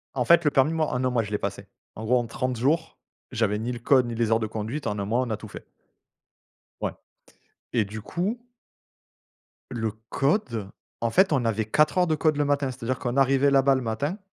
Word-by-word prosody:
En 125 - +1
fait, 170 +6 +5
le 150 - +4
permis, 135 +3 +3
moi, 160 -1 0
en 125 -2 -2
1 130 - +2
mois, 120 -2 +1
je 105 - -8
l'ai 105 - +1
passé. 100 0 -5 0.3
En 110 - -6
gros, 125 +3 +3
en 120 - 0
30 125 +2 -2
jours, 155 +8 0 0.4
j'avais 110 -3 +1
ni 120 +3 -3
le 120 - -6
code 130 +2 +4
ni 120 - -4
les 115 -1 0
heures 110 - +4
de 110 - -2
conduite, 110 +6 -4
en 105 -2 -2
1 100 - -2
mois, 115 +5 0
on 125 - -3
a 110 - 0
tout - - -10
fait. - - -10 1.2
Ouais - - -1 0.8
et 115 - +2
du 105 +2 -7
coup 185 - -2 1.3
le 115 -3 -2 0.2
code, 130 - 0 0.3
en 115 - +1
fait, 185 - +4
on 135 -4 +2
avait 110 -1 0
4 150 - +2
heures 180 - +5
de 160 - +1
code 155 -1 +1
le 145 - +2
matin, 140 -1 +1
c'est-à-dire 130 0 -3
qu'on 125 +1 -2
arrivait 135 +1 +4
là-bas 135 0 +4
le 130 - 0
matin, 135 - -2
125 Hz, 225 wpm, -25 LUFS, 110-145 Hz, 1.3 s, fait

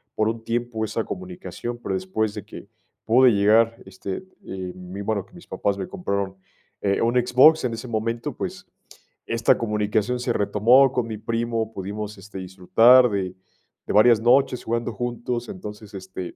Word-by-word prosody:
por 110 0 +1
un 115 0 -4
tiempo 115 -1 -2
esa 110 +1 -2
comunicación, 180 - -6
pero - - -2
después 95 +3 -1
de - - -7
que - - -11 0.4
pude 125 +2 +5
llegar, 110 +2 +4
este, 95 - -6 0.2
eh, 95 -1 -6
mm, 90 +2 -8
bueno, 100 -2 -2
que - - -27
mis 175 -1 -14
papás 100 -1 -1
me 95 - -5
compraron, 100 - -3 0.4
eh, 100 -1 0
un 115 +2 +1
Xbox 125 +5 +5
en 120 - -1
ese 115 +2 -7
momento, 115 +1 -2
pues, - - -6 0.6
esta 115 0 +3
comunicación 105 +2 0
se 120 -1 -1
retomó 120 +6 +4
con 125 -2 -1
mi 110 -1 -5
primo, 115 0 -2
pudimos, 105 +1 -6
este, 95 0 -9
disfrutar 115 +7 +5
de 95 -3 -3 0.5
de - - -2
varias 110 +2 +6
noches 125 +2 +3
jugando 115 +1 -2
juntos. 120 +1 -4
Entonces, 105 - -9
este, 95 -2 -7
110 Hz, 165 wpm, -23 LUFS, 100-120 Hz, 0.6 s, varias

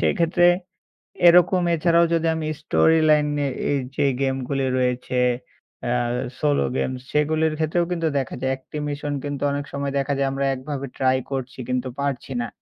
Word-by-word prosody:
সেক্ষেত্রে। 170 +1 +2 0.8
এরকম 180 +1 +5
এছাড়াও 170 +1 +3
যদি 165 0 +1
আমি 155 -1 -3
স্টোরি 160 +1 +3
লাইনে 150 -1 +2 0.2
এই 145 - +2 0.2
যে 145 - +2 0.2
গেমগুলি 135 0 -1
রয়েছে। 125 0 -1 0.7
আ - - 0 0.5
সোলো 145 -1 +2
গেমস 130 -1 -2
সেগুলির 155 +1 +1
ক্ষেত্রেও 160 +2 +1
কিন্তু 165 -2 0
দেখা 130 - -3
যায়। 130 - +1
একটি 135 - -12
মিশন 145 0 -3
কিন্তু 145 -1 -4
অনেক 145 0 -2
সময় 140 0 -3
দেখা 140 +1 -1
যায় 135 - +1
আমরা 135 0 -1
একভাবে 135 +1 -5
ট্রাই 130 0 +2
করছি 135 -1 -4
কিন্তু 125 0 -1
পারছি 140 -2 -3
না। 120 - -3
145 Hz, 155 wpm, -23 LUFS, 135-155 Hz, 0.8 s, এরকম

